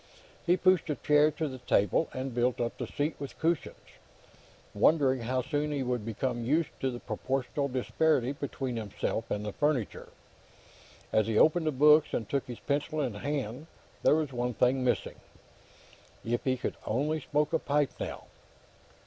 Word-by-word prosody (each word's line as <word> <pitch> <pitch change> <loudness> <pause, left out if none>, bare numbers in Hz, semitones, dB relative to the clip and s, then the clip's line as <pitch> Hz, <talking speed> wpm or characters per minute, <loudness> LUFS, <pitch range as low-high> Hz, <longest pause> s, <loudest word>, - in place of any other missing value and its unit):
He 175 +2 +4
pushed 185 -1 +3
a 150 - 0
chair 150 +1 +4
to 155 +1 -3
the 130 -2 -7
table 110 - +2
and 130 0 -4
built 125 +1 +1
up 120 -1 -1
the - - -3
seat 150 +2 -2
with 140 -1 -7
cushions, 165 -1 0 1.0
wondering 130 +4 +3
how 125 +2 -1
soon 145 +3 -1
he 140 -2 -1
would 125 -3 -1
become 120 +2 -2
used 155 +7 +1
to 135 - 0
the 120 -1 -5
proportional 130 +5 -2
disparity 130 +1 +1
between 135 -3 -4
himself 105 -3 -3
and 105 0 -2
the 105 - -4
furniture. 145 -7 -1 1.0
As 110 -1 +3
he 110 -1 0
opened 160 +4 +4
the - - +3
books 150 +2 +5
and 110 - -2
took 140 +3 -1
his 120 -2 -7
pencil 150 +2 -1
in 130 -6 -1
his 105 - -8
hand, 140 0 -3 0.3
there - - +5
was 155 -4 -1
one 120 -1 -2
thing 130 +1 +2
missing. 120 -7 -1 1.1
If 120 +1 -1
he 130 -1 +1
could - - -4
only 145 +8 0
smoke 150 +2 0
a 160 - +3
pipe, 145 -1 +1
now! - - -5
135 Hz, 175 wpm, -30 LUFS, 120-150 Hz, 1.1 s, books